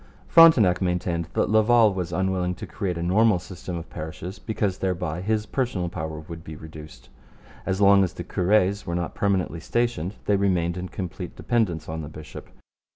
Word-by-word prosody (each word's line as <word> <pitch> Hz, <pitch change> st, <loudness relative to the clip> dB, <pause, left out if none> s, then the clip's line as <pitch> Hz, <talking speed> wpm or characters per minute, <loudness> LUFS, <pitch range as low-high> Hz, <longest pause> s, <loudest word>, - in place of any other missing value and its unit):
Frontenac 125 Hz, -, +6 dB
maintained 90 Hz, -2 st, -1 dB
that -, -, +1 dB
Laval 110 Hz, 0 st, +5 dB
was 90 Hz, -3 st, -3 dB
unwilling 90 Hz, 0 st, 0 dB
to -, -, -7 dB
create 95 Hz, -5 st, -3 dB
a 85 Hz, -, -3 dB
normal 105 Hz, +3 st, +4 dB
system 90 Hz, 0 st, -7 dB
of 85 Hz, -, -7 dB
parishes 80 Hz, +4 st, -7 dB
because 105 Hz, -4 st, -2 dB
thereby 90 Hz, -3 st, -2 dB
his 105 Hz, +2 st, 0 dB
personal 115 Hz, -11 st, -2 dB
power 80 Hz, -2 st, -5 dB
would 80 Hz, +1 st, -9 dB
be 80 Hz, -1 st, -8 dB
reduced. 75 Hz, -5 st, -12 dB, 0.6 s
As 95 Hz, +1 st, -1 dB
long 100 Hz, 0 st, +6 dB
as 90 Hz, -1 st, -2 dB
the -, -, -6 dB
cures 100 Hz, +1 st, +1 dB
were 85 Hz, -, -2 dB
not 85 Hz, -1 st, -3 dB
permanently 95 Hz, -5 st, 0 dB
stationed 115 Hz, -4 st, -1 dB
they 100 Hz, -, +3 dB
remained 90 Hz, -4 st, +1 dB
in 90 Hz, 0 st, -5 dB
complete 90 Hz, -1 st, -6 dB
dependence 95 Hz, -10 st, -1 dB
on 80 Hz, 0 st, -4 dB
the 75 Hz, -, -7 dB
bishop. 75 Hz, 0 st, -10 dB
90 Hz, 175 wpm, -25 LUFS, 85-100 Hz, 0.6 s, Frontenac